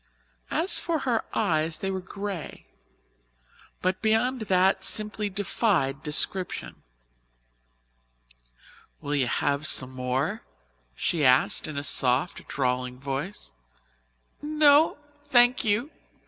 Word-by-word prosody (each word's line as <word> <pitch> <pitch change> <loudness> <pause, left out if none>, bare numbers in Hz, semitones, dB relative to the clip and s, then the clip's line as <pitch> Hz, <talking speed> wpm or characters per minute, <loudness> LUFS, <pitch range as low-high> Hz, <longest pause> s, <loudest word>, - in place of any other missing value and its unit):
As 365 - +1
for 325 -3 -2
her 235 -3 +1
eyes, 160 -6 0
they 195 +3 -3
were 190 - -3
grey, 195 -2 -7 1.2
but 185 +1 0
beyond 225 +4 +1
that 190 +1 +3
simply 210 +1 0
defied 185 - 0
description. 180 +5 -1 2.2
"Will 145 - -4
you 135 -4 +1
have 145 +4 0
some 130 -1 +3
more?" 130 - -2 0.5
she 160 - -1
asked 130 -1 +3
in 150 - -6
a 140 - -2
soft, 130 +3 +1
drawling 125 -1 -2
voice. 135 - -5 0.9
"No, 300 0 +4 0.3
thank 245 -2 +4
you. 225 +7 0
185 Hz, 105 wpm, -26 LUFS, 140-220 Hz, 2.2 s, No